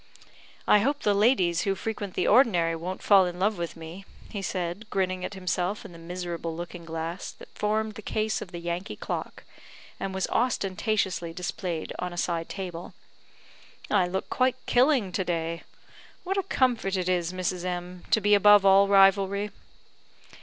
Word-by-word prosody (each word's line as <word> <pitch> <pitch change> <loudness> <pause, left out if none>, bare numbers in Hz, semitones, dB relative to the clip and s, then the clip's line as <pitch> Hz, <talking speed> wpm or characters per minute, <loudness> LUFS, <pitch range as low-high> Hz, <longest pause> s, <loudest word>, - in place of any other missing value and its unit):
"I 210 - +6
hope 280 +7 0
the 205 - +3
ladies 200 -6 +3
who 195 -1 0
frequent 205 -1 -5
the - - +1
ordinary 180 -9 +4
won't 180 +4 -5
fall 195 -3 +6
in 175 0 -5
love 200 +1 0
with 170 -1 -4
me," 165 +4 -9 0.4
said 175 -2 -2
he, 220 - -13
grinning 185 -2 -1
at 205 - -5
himself 185 +1 -2
in - - -9
the 170 - -12
miserable 170 -1 -5
looking 170 0 -7
glass 165 +2 -4
that - - -15
formed 215 +1 -1
the 215 - -9
case 215 +1 -1
of 175 - -8
the 175 - -6
Yankee 170 +2 -4
clock, - - -5 0.6
and 195 - -3
was 190 -1 -1
ostentatiously 195 -6 0
displayed 180 -1 -4
on 180 0 -3
a - - -9
side 165 -1 -1
table; 180 -3 -6 1.0
"I 190 -4 +3
look 190 +2 -3
quite 255 -1 +2
killing 250 -6 +3
to 190 - -1
day. 165 -1 -2 0.6
What 385 +1 -2
a 395 - +2
comfort 245 - +1
it 180 -1 -2
is, 175 -2 +1
Mrs. 185 -1 -2
M, 180 0 -5
to - - +4
be 205 0 +3
above 205 0 +7
all 195 +1 +6
rivalry." 200 +1 +4
185 Hz, 170 wpm, -27 LUFS, 175-205 Hz, 1.0 s, above